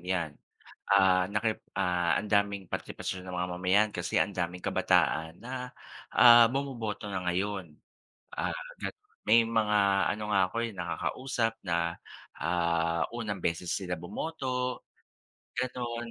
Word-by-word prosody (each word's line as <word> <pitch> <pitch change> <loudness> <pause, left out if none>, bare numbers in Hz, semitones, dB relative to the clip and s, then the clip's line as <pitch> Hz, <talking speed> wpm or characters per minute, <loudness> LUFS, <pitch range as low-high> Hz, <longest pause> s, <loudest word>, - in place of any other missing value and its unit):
'yan, 85 -3 -2 0.6
ah, 95 -2 +5
naki 105 +3 -1 0.2
ah, 90 -1 +1
ang 105 - -8
daming 100 -3 +1
partipasyon 95 -1 -5
ng 90 - -7
mga 90 0 -1
mamayan 95 +4 +3
kasi 90 -3 0
ang - - +1
daming 90 +1 -2
kabataan 80 0 +1
na, 125 +1 -6 0.4
ah, 120 -1 +9
bumoboto 120 -6 -3
na 95 -2 -3
ngayon. 90 -1 -2 0.6
Ah, - - -1 0.7
may 115 +2 +6
mga 110 -2 +2 0.3
ano 105 +1 -4
nga 95 - +5
ako 115 - -6 0.2
nakakausap 120 -1 -1
na, 85 -1 0 0.4
ah, 85 -1 +1
unang 105 -5 -4
beses 85 +1 -1
sila 90 -2 -2
bumoto, 125 - -3 0.7
gano'n. 120 -2 -3
100 Hz, 125 wpm, -29 LUFS, 90-115 Hz, 0.7 s, ah